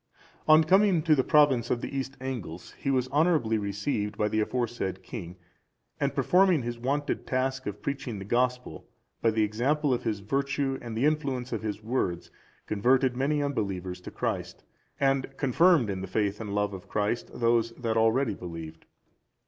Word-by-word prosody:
On 155 +1 +7
coming 195 +6 +5
into 165 -4 +3
the 135 -3 +3
province 135 -6 +4
of 120 - 0
the - - -5
East 135 0 -4
Angles, 115 -11 -6
he - - -5
was 130 -2 +1
honourably 145 -8 +2
received 105 +1 -2
by 105 - +1
the 110 - 0
aforesaid 110 -5 -2
king, 90 -7 -7 0.6
and - - 0
performing 180 -6 +4
his 120 0 -4
wonted 140 +4 -2
task 130 0 -1
of 105 0 -6
preaching 135 -5 -3
the 95 - -7
Gospel, 125 -5 -1 0.3
by 115 - +4
the 110 0 +2
example 130 +7 +1
of 120 - -1
his 105 -2 -2
virtue 135 +4 -1
and 115 -2 -6
the 125 - +2
influence 140 -5 0
of 115 - -2
his 105 -1 -4
words, 105 -7 -2 0.3
converted 125 +4 +2
many 145 +3 +1
unbelievers 95 -9 -3
to - - -8
Christ, - - -4 0.4
and 135 -1 0
confirmed 145 +1 +4
in 95 -2 -3
the 95 - -5
faith 105 +2 -1
and 105 -2 -4
love 105 0 0
of 95 -2 -9
Christ 105 +3 -1
those 115 -1 +3
that 115 -2 -2
already 115 +3 +2
believed. 80 -2 -8
120 Hz, 175 wpm, -28 LUFS, 105-140 Hz, 0.6 s, On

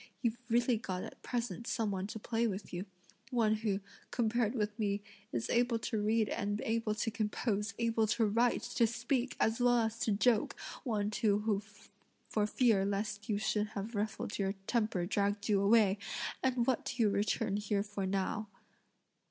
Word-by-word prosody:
You've 235 0 0
really 240 +1 +3
got 185 -4 -4
at - - -9
present 235 -2 -3
some 225 -4 0
one 190 0 -2
to 220 - -6
play 230 +2 0
with 195 -2 -5
you, 180 +3 -4 0.4
one 225 -4 +2
who, 210 -2 -1 0.3
compared 235 0 +1
with 210 -1 -1
me, 200 -1 0 0.3
is 120 -2 -1
able 240 0 +3
to 220 -1 -2
read 215 +1 +2
and 205 0 -1
able 225 -1 0
to 225 +1 -1
compose, 210 -1 -1
able 230 -1 +2
to 225 +1 +2
write, 230 +2 +2
to 240 -1 +2
speak, 245 +3 -1
as 225 +2 +2
well 245 0 +5
as 225 -1 0
to 220 - +1
joke, 215 +2 +2 0.2
one 210 -6 0
too 210 -1 +2
who 210 -2 +1 0.7
for 210 -1 +1
fear 220 -4 +3
lest 205 +1 -2
you 210 - +2
should 210 0 0
have 205 +4 -4
ruffled 210 0 -2
your 195 -1 +1
temper 215 -7 +1
dragged 200 +1 0
you 205 -3 +3
away: 205 -1 +5 0.4
and 255 -2 +2
what 255 -2 +1
do 245 -2 0
you 210 - +4
return 200 0 0
here 205 -1 0
for 205 -2 -3
now?" 195 +3 -1
215 Hz, 175 wpm, -33 LUFS, 205-230 Hz, 0.7 s, well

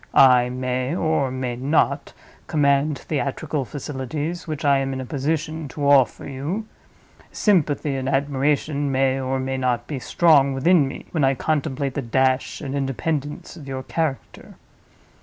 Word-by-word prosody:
I 125 -2 +6
may, 130 +3 -2
or 160 -6 +1
may 130 -1 -3
not, 140 +2 0 0.3
command 140 -1 +2
theatrical 145 0 -3
facilities, 145 +5 -5
which 155 -1 -4
I 140 -1 +4
am 135 0 -2
in 130 - -4
a 130 - -4
position 155 +3 -2
to 140 +2 -3
offer 135 -4 +4
you. 150 +11 -4 0.7
Sympathy 150 -8 +1
and 130 0 -2
admiration 140 +1 0
may, 135 0 +2
or 130 0 -1
may 130 0 -2
not, 125 -2 0
be 140 -1 -4
strong 140 -2 +4
within 150 +2 +4
me, 135 - -8
when 160 -4 0
I 135 0 +3
contemplate 140 -2 -1
the 140 - -2
dash 130 +2 0
and 140 -3 -5
independence 140 +3 -3
of 150 -5 -11
your 130 -1 -4
character. 155 -2 -4
140 Hz, 150 wpm, -23 LUFS, 130-150 Hz, 0.7 s, I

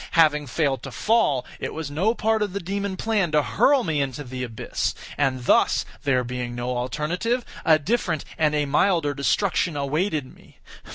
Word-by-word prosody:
Having 150 -3 +4
failed 135 -1 0
to - - -7
fall, 210 - +2
it - - -4
was 155 -2 -5
no 195 +10 +1
part 220 0 +1
of 205 -3 -1
the 200 - -2
demon 200 +1 -3
plan 205 -7 0
to 150 -1 +4
hurl 275 - +3
me 155 -6 0
into 135 +1 -3
the 125 -1 -5
abyss; 115 -3 -3 0.2
and 130 -3 0
thus - - +3 0.2
(there 130 -3 +2
being 125 0 -4
no 120 +1 -2
alternative) 170 - -1 0.2
a 160 -1 +5
different 170 -2 -1
and 150 -1 +2
a 150 -1 +1
milder 150 +1 +2
destruction 165 +3 0
awaited 150 0 -1
me. - - -21
150 Hz, 175 wpm, -24 LUFS, 135-195 Hz, 0.2 s, a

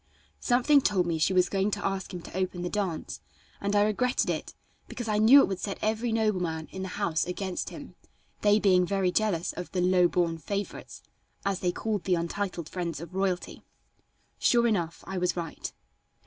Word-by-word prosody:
Something 265 +4 +4
told 190 -7 +2
me 165 -2 -1
she 160 - +3
was 180 -1 +4
going 195 +1 0
to - - -3
ask 195 -1 -2
him 175 -2 -7
to - - -10
open 185 -1 -2
the 180 - -3
dance, 190 -6 -3 0.4
and 200 +1 0
I 205 - +5
regretted 245 +5 +1
it, - - -5 0.3
because 240 -2 -6
I 210 -1 +1
knew 245 +6 +8
it - - +2
would 190 -2 -3
set 200 - -4
every 220 +2 0
nobleman 180 -8 0
in 190 - -6
the 190 - -3
house 170 -6 +1
against 185 0 -3
him, - - -10 0.5
they 205 0 +5
being 185 -3 +4
very 190 0 +1
jealous 190 -5 0
of 180 - -7
the 185 - 0
"low 180 0 +4
born 170 -2 0
favorites," 200 +4 -5 0.4
as 195 -2 0
they 180 - +1
called 210 -1 -3
the 185 - +3
untitled 170 0 -3
friends 170 -5 -4
of 170 +2 -9
royalty. 190 -2 -2 0.8
Sure 235 -1 +4
enough, 175 -8 -1
I 190 - -3
was 180 -1 0
right. 165 -2 -5
190 Hz, 190 wpm, -28 LUFS, 175-210 Hz, 0.8 s, knew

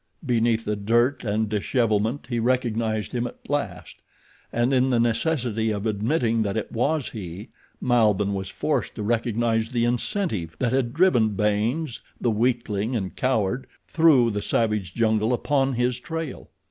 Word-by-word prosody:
Beneath 115 -2 +1
the 105 - 0
dirt 120 +6 +1
and 110 0 0
dishevelment 110 +3 0
he 120 -2 -1
recognized 115 -3 0
him 120 0 -1
at - - -13
last, 100 - -3 0.5
and 120 +3 +1
in 130 0 +3
the 120 -2 +2
necessity 115 -2 0
of 105 -1 -2
admitting 115 +2 +1
that 100 -1 -1
it 110 - -3
was 140 +4 0
he, 100 +1 -8 0.3
Malbihn 105 -5 +2
was 95 -1 -4
forced - - -2
to 105 - -4
recognize 115 0 0
the 120 -2 +1
incentive 120 - -2
that 120 +6 0
had 130 -3 +1
driven 120 - +3
Baynes, 110 - 0 0.2
the 120 - +1
weakling 115 0 0
and 95 -5 -3
coward, 125 -1 0 0.2
through 145 -8 +4
the 105 0 -2
savage 105 -6 -1
jungle 110 0 +2
upon 135 +1 +1
his 125 +1 0
trail. 160 0 -6
115 Hz, 150 wpm, -24 LUFS, 105-125 Hz, 0.5 s, through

